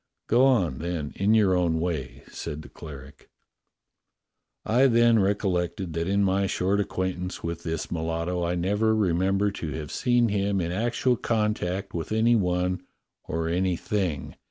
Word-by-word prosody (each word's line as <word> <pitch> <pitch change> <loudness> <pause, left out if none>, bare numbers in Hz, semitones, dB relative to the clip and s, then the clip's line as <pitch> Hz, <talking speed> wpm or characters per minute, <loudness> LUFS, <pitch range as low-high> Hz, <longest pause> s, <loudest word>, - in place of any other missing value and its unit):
"Go 125 +4 +4
on, 95 - +2
then, 85 -3 -3
in 105 +3 +3
your 100 -4 +4
own 85 -3 +1
way," 80 -7 -3
said 75 +1 -6
the 75 - -12
cleric. 70 -2 -11 1.4
"I 125 +5 +4
then 115 -2 +4
recollected 95 -2 0
that 85 +1 -2
in 100 +1 +2
my 95 0 +2
short 95 +2 0
acquaintance 95 -2 -3
with 85 0 -4
this 80 -2 -4
mulatto 85 +2 -2
I 85 +1 0
never 105 +5 +1
remember 95 +1 +1
to 85 -5 -5
have 75 -2 -6
seen 120 -2 +2
him 100 -1 0
in 85 -1 -2
actual 120 +5 +1
contact 105 -4 -1
with 85 +2 -4
any 115 +2 +3
one, 90 -2 0 0.4
or 80 0 -2
any 90 +2 +1
thing. 90 - -2
95 Hz, 155 wpm, -26 LUFS, 85-105 Hz, 1.4 s, Go